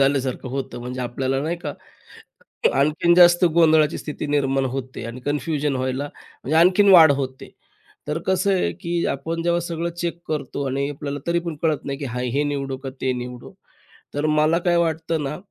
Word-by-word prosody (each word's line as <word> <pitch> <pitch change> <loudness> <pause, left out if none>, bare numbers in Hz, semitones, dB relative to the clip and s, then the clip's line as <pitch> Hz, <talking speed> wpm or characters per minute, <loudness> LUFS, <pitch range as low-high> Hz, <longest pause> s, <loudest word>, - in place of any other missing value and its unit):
झाल्यासारखं 135 -2 0
होतं. 135 -1 -4
म्हणजे 125 +1 -5
आपल्याला 130 +2 -1
नाही 165 +3 -2
का? 155 -4 -5 1.0
आणखीन 155 +5 +3
जास्त 175 0 +6
गोंधळाची 160 -2 +4
स्थिती 150 0 -5
निर्माण 135 -2 +1
होते 130 -3 -5
आणि 115 +2 -7
कन्फ्युजन 145 +1 -1
व्हायला, 130 +2 -2 0.4
म्हणजे 155 +4 0
आणखीन 185 +4 +5
वाढ 160 -4 +9
होते. 130 -1 -6 0.6
तर 150 +2 -1
कसं 190 +1 +2
आहे 185 - +1
की 170 0 -1
आपण 165 +4 -3
जेव्हा 170 0 +1
सगळं 170 0 -3
चेक 170 -1 -2
करतो 140 -2 -3
आणि 135 +1 -1
आपल्याला 145 0 -5
तरी 170 0 +2
पण 165 -3 -4
कळत 155 -3 0
नाही, 140 -1 -4
की 145 - -5
हां, 125 -1 -4
हे 135 +4 0
निवडू 135 -1 -3
का 135 - -3
ते 130 -1 +1
निवडू? 125 0 -9 0.6
तर 145 +2 0
मला 155 +2 +3
काय 175 -1 +4
वाटतं 165 -1 0
ना, 140 +2 -3
145 Hz, 180 wpm, -22 LUFS, 135-165 Hz, 1.0 s, वाढ